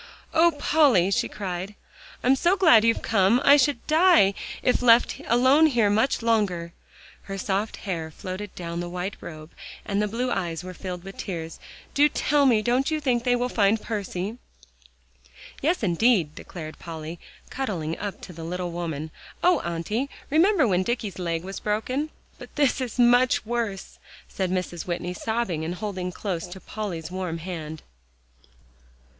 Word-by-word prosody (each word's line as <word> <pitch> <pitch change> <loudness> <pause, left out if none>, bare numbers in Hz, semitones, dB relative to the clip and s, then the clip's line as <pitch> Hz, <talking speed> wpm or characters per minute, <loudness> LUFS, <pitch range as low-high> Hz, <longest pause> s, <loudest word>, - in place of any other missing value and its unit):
"Oh, 330 +1 +6
Polly!" 270 - +4
she - - +1
cried, 190 0 -5 0.5
"I'm 255 +2 +5
so 350 +8 +2
glad 320 - +6
you've 230 0 +2
come. 205 +2 +3
I 285 - +9
should 280 -3 +1
die 315 - +5 0.3
if 250 - +2
left 235 -1 +4
alone 260 +6 +5
here 230 -8 +2
much 225 +3 +1
longer;" 190 -7 0 0.6
her 195 - -4
soft 200 +2 -2
hair 165 -5 -3
floated 185 +5 -7
down 170 -1 -5
the 175 0 -4
white 180 +3 -4
robe, 155 0 -9 0.3
and 200 0 0
the 210 - +1
blue 245 +4 -2
eyes 170 -5 -2
were 185 0 -7
filled 180 -1 -6
with 195 +1 -10
tears. 165 -4 -5 0.3
"Do 295 +1 +5
tell 290 -1 +2
me, 220 -4 +3
don't 250 +5 +1
you 310 -1 0
think 250 -5 0
they 245 0 +3
will 245 0 0
find 215 -2 +2
Percy?" 205 +1 -4 1.2
"Yes, 325 -1 +1
indeed!" 180 -3 +2
declared 155 -1 -9
Polly, 165 0 -7 0.3
cuddling 175 -12 -3
up 205 -1 -5
to 180 - -9
the 165 0 -8
little 175 +1 -3
woman. 160 -3 -4 0.3
"Oh, 360 +1 +5
Auntie! 170 +11 -2 0.2
remember 325 - +4
when 185 -3 +2
Dicky's 215 -2 -3
leg 165 -2 -2
was 195 +1 -6
broken." 255 +8 -1 0.3
"But - - -12
this 285 -2 +2
is 250 -2 -4
much 245 0 +4
worse," 225 -4 -3 0.3
said 190 -2 -2
Mrs. 180 -2 -3
Whitney, 175 0 -3
sobbing, 220 -6 -2
and 170 +3 -3
holding 185 -3 -4
close 180 -3 -4
to 180 +2 -9
Polly's 180 -6 -5
warm 180 -3 -3
hand. 160 -3 -6
200 Hz, 160 wpm, -25 LUFS, 175-245 Hz, 1.2 s, I